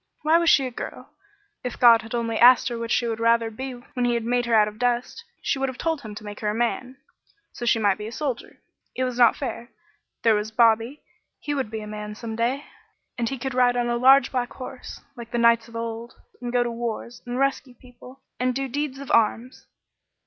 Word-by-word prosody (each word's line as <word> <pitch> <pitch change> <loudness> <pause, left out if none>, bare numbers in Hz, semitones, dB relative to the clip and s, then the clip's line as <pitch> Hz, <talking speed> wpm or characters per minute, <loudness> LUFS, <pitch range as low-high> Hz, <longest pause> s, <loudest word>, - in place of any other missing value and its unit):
Why 320 +2 +4
was 340 -1 +3
she 270 - +5
a 255 - -4
girl? - - -8 0.5
If 250 - -5
God 235 -2 +7
had 225 +2 -6
only 230 -1 -1
asked 250 +2 +7
her 235 -1 -4
which 230 0 -4
she 240 - +2
would 225 -1 -2
rather 230 0 +2
be 260 +4 -6
when 250 +1 -6
he 240 0 +2
had 235 - -1
made 245 +1 0
her 230 - +3
out 210 -1 +5
of 210 +1 -9
dust, 245 0 -1 0.2
she 270 - 0
would 270 0 0
have 255 - -8
told 325 -3 -1
him 215 -2 -9
to 215 - -9
make 205 0 -8
her 210 - -1
a 210 - -2
man, 250 +2 -2 0.6
so 240 - -5
she 235 - +4
might 205 -2 +1
be 210 - -5
a - - -7
soldier. 265 -2 -4 0.4
It 255 - -1
was 250 -1 -3
not 235 -2 +6
fair. 240 -2 -5 0.5
There 225 - +5
was 210 0 -1
Bobby; 230 +4 +2 0.4
he 295 - -3
would 270 -6 -2
be 220 0 -5
a - - -7
man 210 0 -7
some 225 0 -6
day, 250 +5 -1 0.5
and 235 -2 -1
he 270 - -4
could 265 +1 -4
ride 245 -1 +3
on 240 0 0
a 240 - +1
large 265 +3 +5
black 245 -2 -2
horse 255 -1 -9
like 235 -2 -9
the 240 - -3
knights 235 -1 +4
of 230 - -14
old, 230 +1 -5 0.3
and 240 -1 -4
go 245 0 +2
to 240 - -3
wars, 235 0 -5
and 245 +1 -3
rescue 270 -1 -1
people, 250 +1 -16 0.2
and 250 0 0
do 270 0 -2
deeds 285 +1 -3
of 275 -1 -7
arms. 230 +3 +1
240 Hz, 235 wpm, -24 LUFS, 230-255 Hz, 0.6 s, God